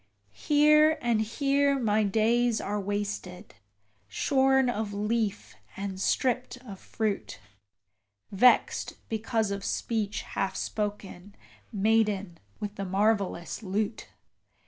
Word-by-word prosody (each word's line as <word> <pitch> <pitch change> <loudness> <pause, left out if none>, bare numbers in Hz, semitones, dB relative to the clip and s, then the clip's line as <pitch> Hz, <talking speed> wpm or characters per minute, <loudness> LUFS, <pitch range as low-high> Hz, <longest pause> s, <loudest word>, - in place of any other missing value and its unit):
Here 300 +1 +5
and 235 -2 +1
here 280 +5 +1
my 220 -4 +1
days 225 +3 +2
are 205 +1 -3
wasted, 200 -2 -4 0.5
shorn 265 - +2
of 215 -3 -2
leaf 205 - -2 0.2
and 195 -1 -5
stript 250 +2 0
of 195 -5 -9
fruit: 215 -3 -3 0.9
Vexed 245 +6 +3
because 220 -1 -1
of 200 0 -4
speech 215 -2 -2
half 190 -1 -3
spoken, 205 -2 -5 0.4
maiden 205 -4 +1 0.2
with 210 0 -6
the 195 - -3
marvellous 195 -3 0
lute! 210 +2 -3
210 Hz, 100 wpm, -28 LUFS, 200-235 Hz, 0.9 s, Here